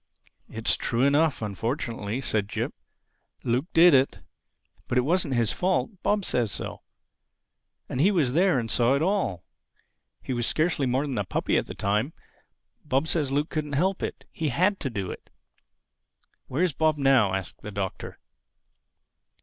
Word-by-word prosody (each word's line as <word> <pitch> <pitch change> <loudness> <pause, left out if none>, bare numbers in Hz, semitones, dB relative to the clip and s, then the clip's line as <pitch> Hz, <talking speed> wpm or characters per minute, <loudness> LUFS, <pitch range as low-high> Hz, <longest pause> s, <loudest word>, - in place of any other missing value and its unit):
"It's 110 0 +1
true 120 +2 -1
enough—unfortunately," 120 - 0
said 105 -5 -1
Jip. - - -3 0.7
"Luke 125 +6 0
did 170 0 +7
it. 135 0 +3 0.7
But 125 - 0
it - - +5
wasn't 155 0 +1
his 115 -3 +2
fault. 185 +2 -1
Bob 205 -2 +1
says 115 -5 0
so. - - -5 1.1
And 130 - -2
he 185 - +5
was 155 -11 +1
there 180 -1 +3
and 115 -3 -2
saw 120 +4 +3
it 140 - 0
all. 185 - 0 0.8
He 130 - -3
was 120 -1 0
scarcely 155 -4 +1
more 130 +4 +1
than 135 -6 -2
a - - 0
puppy 95 - -1
at - - +1
the - - -7
time. 105 +9 0 0.7
Bob 140 +1 0
says 150 -5 +1
Luke 145 +3 0
couldn't 150 -2 -3
help 185 +7 +1
it. - - -5
He 155 -2 -2
had 185 +9 +1
to 135 - -2
do 100 -6 -4
it." - - -11 1.2
"Where 140 +7 0
is 180 -5 +1
Bob 155 +1 +2
now?" 130 -9 +4
asked 95 -2 -6
the 105 - -7
Doctor. 100 -2 -5
135 Hz, 160 wpm, -26 LUFS, 115-160 Hz, 1.2 s, did